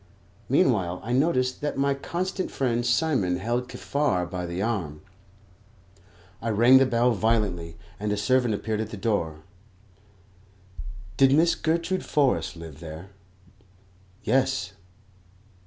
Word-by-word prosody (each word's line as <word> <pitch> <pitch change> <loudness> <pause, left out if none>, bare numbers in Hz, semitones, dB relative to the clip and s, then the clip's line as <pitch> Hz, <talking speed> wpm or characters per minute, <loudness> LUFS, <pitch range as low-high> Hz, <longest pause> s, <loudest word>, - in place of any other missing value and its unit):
Meanwhile 95 -10 +2
I 120 - -3
noticed 130 -2 +1
that 145 -1 -2
my 140 0 +2
constant 185 +7 -3
friend 120 -3 -1
Simon 120 - +1
held 120 +6 -2
Kaffar 120 -12 -1
by 90 0 -5
the 85 +1 -4
arm. 95 -9 -2 1.4
I 115 - -2
rang 120 +5 +6
the 135 - +4
bell 120 0 +2
violently, 100 -7 0 0.2
and 105 0 -2
a 105 - 0
servant 120 +1 +2
appeared 110 +1 -2
at 110 - -4
the 110 - -7
door. 85 -7 -2 1.7
Did 135 0 +5
Miss 165 +2 +4
Gertrude 170 +3 -1
Forrest 140 - +1
live 80 -3 -10
there? 85 +3 -9 1.1
Yes. 130 -5 0
115 Hz, 125 wpm, -26 LUFS, 95-135 Hz, 1.7 s, rang